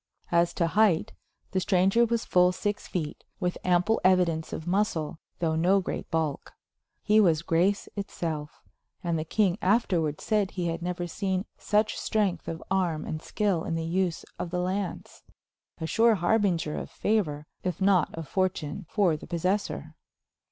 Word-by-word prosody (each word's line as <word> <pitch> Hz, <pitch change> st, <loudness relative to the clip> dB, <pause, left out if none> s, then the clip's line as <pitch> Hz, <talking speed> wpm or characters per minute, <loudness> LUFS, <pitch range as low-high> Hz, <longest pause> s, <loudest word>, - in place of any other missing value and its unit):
As 170 Hz, 0 st, +3 dB
to 170 Hz, -, +2 dB
height, 185 Hz, -1 st, +2 dB, 0.4 s
the 190 Hz, -, +1 dB
stranger 190 Hz, +5 st, +3 dB
was 235 Hz, 0 st, -1 dB
full 180 Hz, 0 st, +4 dB
six 205 Hz, +3 st, -3 dB
feet, 155 Hz, -5 st, -4 dB, 0.2 s
with 180 Hz, -3 st, -1 dB
ample 180 Hz, +5 st, +2 dB
evidence 180 Hz, -4 st, +3 dB
of 160 Hz, -, -5 dB
muscle, 175 Hz, -4 st, 0 dB, 0.2 s
though 160 Hz, -2 st, 0 dB
no 180 Hz, +5 st, +4 dB
great 185 Hz, -, -4 dB
bulk. 160 Hz, -3 st, -2 dB, 0.5 s
He 215 Hz, +1 st, +4 dB
was 170 Hz, -6 st, +4 dB
grace 180 Hz, +5 st, +1 dB
itself, 160 Hz, -7 st, -4 dB, 0.4 s
and 170 Hz, -2 st, 0 dB
the -, -, -1 dB
king 195 Hz, +3 st, +1 dB
afterwards 180 Hz, -7 st, +1 dB
said 210 Hz, -3 st, +1 dB
he 175 Hz, -3 st, -2 dB
had 165 Hz, +1 st, -3 dB
never 175 Hz, 0 st, -2 dB
seen 190 Hz, +2 st, -2 dB
such 210 Hz, 0 st, +1 dB
strength 200 Hz, -6 st, 0 dB
of 165 Hz, 0 st, -5 dB
arm 175 Hz, -5 st, 0 dB
and 155 Hz, -, -4 dB
skill 195 Hz, -5 st, 0 dB
in 165 Hz, -, -2 dB
the 165 Hz, 0 st, -2 dB
use 175 Hz, 0 st, -1 dB
of 175 Hz, -, -3 dB
the 180 Hz, -, -2 dB
lance 185 Hz, 0 st, -3 dB, 0.6 s
a 160 Hz, -, -3 dB
sure 225 Hz, +7 st, +4 dB
harbinger 175 Hz, -4 st, +1 dB
of -, -, -7 dB
favor, 155 Hz, -9 st, 0 dB, 0.2 s
if 180 Hz, -3 st, -2 dB
not 190 Hz, -4 st, +3 dB
of 165 Hz, -2 st, -6 dB
fortune, 180 Hz, -1 st, -2 dB
for 190 Hz, -7 st, +2 dB
the 150 Hz, -, -9 dB
possessor. 180 Hz, -, -1 dB
180 Hz, 160 wpm, -27 LUFS, 165-200 Hz, 0.6 s, full